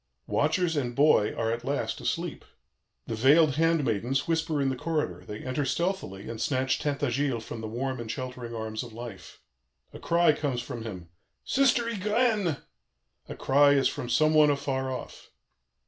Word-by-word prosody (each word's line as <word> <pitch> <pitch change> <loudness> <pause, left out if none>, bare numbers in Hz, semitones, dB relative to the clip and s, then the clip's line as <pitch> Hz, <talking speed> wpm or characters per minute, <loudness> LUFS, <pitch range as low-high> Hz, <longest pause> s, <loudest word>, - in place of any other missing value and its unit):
"Watchers 160 +3 +1
and 125 -4 -2
boy 140 -7 +4
are 115 -1 0
at 115 +1 -3
last 140 +2 -2
asleep. - - -3 0.6
The - - -4
veiled 140 +5 +4
handmaidens 135 - +1
whisper 160 -2 0
in 135 -1 +1
the 130 - -1
corridor; 150 - -2
they 105 0 -8
enter 130 +3 -1
stealthily 140 - -2
and 115 -1 -6
snatch 130 -3 0
Tintagiles 140 -4 -1
from 110 - -6
the 110 - -4
warm 130 +3 -3
and 115 -1 -6
sheltering 125 -2 -5
arms 110 -1 -4
of - - -9
life. 115 -6 -9 0.5
A - - -9
cry 170 -2 +3
comes 140 -5 -2
from 120 -2 -6
him: 90 -6 -7 0.4
'Sister 260 -3 +3
Ygraine!' 210 - +1 0.7
a - - -5
cry 145 +1 +4
as 135 -1 +3
from 120 - -4
some 155 +5 +3
one 155 -1 +6
afar 135 -2 -1
off. 130 - -8
135 Hz, 165 wpm, -28 LUFS, 120-155 Hz, 0.7 s, one